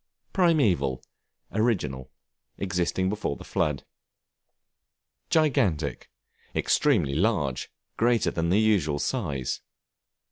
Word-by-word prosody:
Primeval, 100 Hz, -, +2 dB, 0.5 s
original, 75 Hz, -, 0 dB, 0.5 s
existing 95 Hz, -1 st, 0 dB
before 100 Hz, -7 st, -2 dB
the -, -, -11 dB
flood. 75 Hz, -3 st, -1 dB, 1.4 s
Gigantic, 100 Hz, -, +1 dB, 0.5 s
extremely 100 Hz, -, +2 dB
large, 75 Hz, -, 0 dB, 0.3 s
greater 120 Hz, -1 st, +2 dB
than 85 Hz, 0 st, -1 dB
the 95 Hz, +4 st, +4 dB
usual 95 Hz, -10 st, +2 dB
size. 75 Hz, -, -2 dB
90 Hz, 80 wpm, -26 LUFS, 70-110 Hz, 1.4 s, the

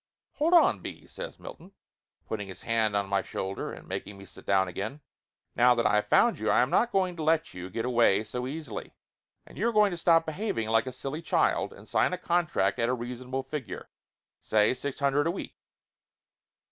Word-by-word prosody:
"Hold 330 Hz, +4 st, +3 dB
on, 340 Hz, -, +5 dB
B.," -, -, -8 dB
says -, -, -8 dB
Milton, 185 Hz, +4 st, -11 dB, 0.5 s
putting 105 Hz, -2 st, -4 dB
his 95 Hz, -, -10 dB
hand 110 Hz, -2 st, +1 dB
on 100 Hz, -1 st, 0 dB
my 100 Hz, 0 st, +1 dB
shoulder 95 Hz, +1 st, -4 dB
and -, -, -11 dB
making 100 Hz, 0 st, -5 dB
me 100 Hz, -, -11 dB
sit 95 Hz, -, -14 dB
down 95 Hz, -1 st, +3 dB
again. 105 Hz, -, -5 dB, 0.5 s
"Now 125 Hz, +1 st, +5 dB
that 115 Hz, -1 st, 0 dB
I 105 Hz, -, +3 dB
have 105 Hz, -, 0 dB
found -, -, +4 dB
you, -, -, -1 dB
I -, -, +5 dB
am 125 Hz, +4 st, +1 dB
not 240 Hz, +7 st, +3 dB
going 185 Hz, -3 st, +1 dB
to -, -, -4 dB
let 160 Hz, +1 st, +1 dB
you 90 Hz, 0 st, -7 dB
get 115 Hz, +5 st, -3 dB
away 115 Hz, -5 st, +3 dB
so 125 Hz, +3 st, -4 dB
easily. 145 Hz, -5 st, -6 dB, 0.5 s
And -, -, -13 dB
you 230 Hz, +4 st, +2 dB
are -, -, -1 dB
going 210 Hz, -2 st, +4 dB
to 175 Hz, -, -4 dB
stop 165 Hz, 0 st, +4 dB
behaving 160 Hz, -, -2 dB
like 115 Hz, +3 st, +2 dB
a -, -, -3 dB
silly 135 Hz, +5 st, -5 dB
child 165 Hz, -, +1 dB
and -, -, -14 dB
sign -, -, +2 dB
a -, -, -1 dB
contract 170 Hz, -, 0 dB
at 115 Hz, +1 st, +2 dB
a 125 Hz, -, +1 dB
reasonable 125 Hz, +2 st, -5 dB
figure 135 Hz, -10 st, -6 dB, 0.5 s
say, 105 Hz, +2 st, +3 dB
six 140 Hz, +1 st, -5 dB
hundred 140 Hz, +2 st, +2 dB
a -, -, +2 dB
week." 190 Hz, -, -7 dB
125 Hz, 210 wpm, -28 LUFS, 105-165 Hz, 0.5 s, on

